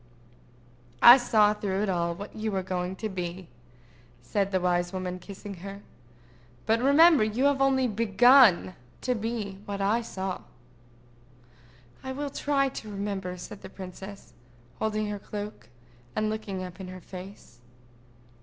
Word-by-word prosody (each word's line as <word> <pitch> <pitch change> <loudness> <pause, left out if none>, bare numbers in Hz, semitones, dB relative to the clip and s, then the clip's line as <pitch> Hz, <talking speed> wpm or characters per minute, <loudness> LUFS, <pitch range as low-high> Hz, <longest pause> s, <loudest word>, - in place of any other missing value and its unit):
"I 240 +2 +12
saw, 215 -4 +3
through 200 -1 -2
it - - 0
all, 170 -2 0
what 205 +4 -9
you 220 0 -2
were 190 -1 -1
going 185 0 -3
to 220 - -4
be," 180 -3 -5 0.7
said 195 +10 0
the 190 - +2
wise 175 -1 0
woman, 185 -1 -4
kissing 200 +2 -9
her. 195 +3 -9 0.8
"But 225 +1 +2
remember 290 +1 +6
you 220 +4 -1
have 285 -1 +4
yet - - -4
only 265 -1 +3
begun 230 -2 +5 0.3
to 250 - 0
be 220 -4 -4
what 200 -1 -4
I 205 +4 +2
saw." 190 -4 -5 1.6
"I 265 0 -4
will 285 +1 -4
try 280 -1 +1
to 220 -4 -8
remember," 195 -3 -4
said 195 +3 -9
the 190 - -9
princess, 190 +1 -10 0.5
holding 215 0 -1
her 205 -1 -4
cloak, 205 - -7 0.5
and 215 0 0
looking 200 -4 -4
up 180 +1 -9
in 190 - -7
her 185 0 -8
face. 185 -9 -11
205 Hz, 150 wpm, -27 LUFS, 185-225 Hz, 1.6 s, I